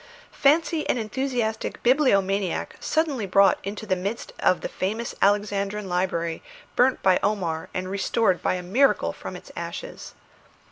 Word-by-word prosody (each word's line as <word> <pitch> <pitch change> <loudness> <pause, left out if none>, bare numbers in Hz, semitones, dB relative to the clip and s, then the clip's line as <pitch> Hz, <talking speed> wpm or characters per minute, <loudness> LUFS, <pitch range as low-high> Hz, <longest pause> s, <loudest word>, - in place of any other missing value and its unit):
Fancy 315 +3 +2
an - - +2
enthusiastic 230 -1 -2
bibliomaniac 200 - +2
suddenly 290 -10 0
brought 195 +1 +4
into 205 +3 -5
the 190 - +1
midst 200 +6 -4
of 185 - +2
the - - -2
famous 220 +5 -3
Alexandrian 205 0 +1
library 175 -2 -1 0.3
burnt 255 +1 +3
by 185 -1 +4
Omar 180 -6 -1
and 185 0 -3
restored 195 0 +1
by - - +1
a 180 - -5
miracle 245 +10 +2
from - - -8
its - - -11
ashes! - - -7
205 Hz, 140 wpm, -25 LUFS, 185-240 Hz, 0.3 s, brought